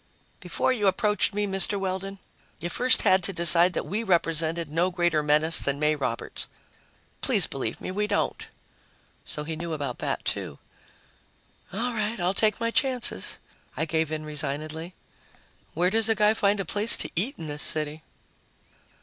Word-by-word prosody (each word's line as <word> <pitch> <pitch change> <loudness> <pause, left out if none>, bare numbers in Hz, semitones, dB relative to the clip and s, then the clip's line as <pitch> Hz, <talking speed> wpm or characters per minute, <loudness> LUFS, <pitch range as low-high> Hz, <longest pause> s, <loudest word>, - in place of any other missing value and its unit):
"Before 260 - -1
you 210 -5 0
approached 210 +3 +1
me, 205 0 -2
Mr. 195 +1 0
Weldon, 195 +1 -4 0.4
you 175 - -5
first 250 +8 +2
had 185 0 +4
to 185 - -2
decide 170 0 +4
that - - -3
we 210 +4 -3
represented 165 -4 0
no 165 +5 0
greater 175 -3 0
menace 150 +2 +5
than 140 0 +3
May 150 +1 +1
Roberts. 130 -5 -4 0.7
Please - - +5
believe - - -5
me, - - -6
we 210 +2 -2
don't." 205 - -2 0.8
So 150 - -3
he 160 +1 -5
knew 165 +1 -5
about 140 -5 -5
that, - - -3
too! 70 - -3 1.1
"All 240 +6 -2
right, 215 0 -3
I'll 175 +2 0
take 215 0 +1
my 230 0 -1
chances," 250 - +1 0.4
I 155 - 0
gave 160 -1 -1
in 155 -1 -4
resignedly. 155 +3 -5 0.8
"Where 175 +3 +1
does 225 +1 +2
a 225 - +3
guy 210 0 +3
find 205 -1 +1
a 195 - -3
place 210 +7 +6
to - - -1
eat 225 - -2
in 160 - -8
this 150 -1 -4
city?" 155 0 +2
175 Hz, 165 wpm, -25 LUFS, 155-210 Hz, 1.1 s, place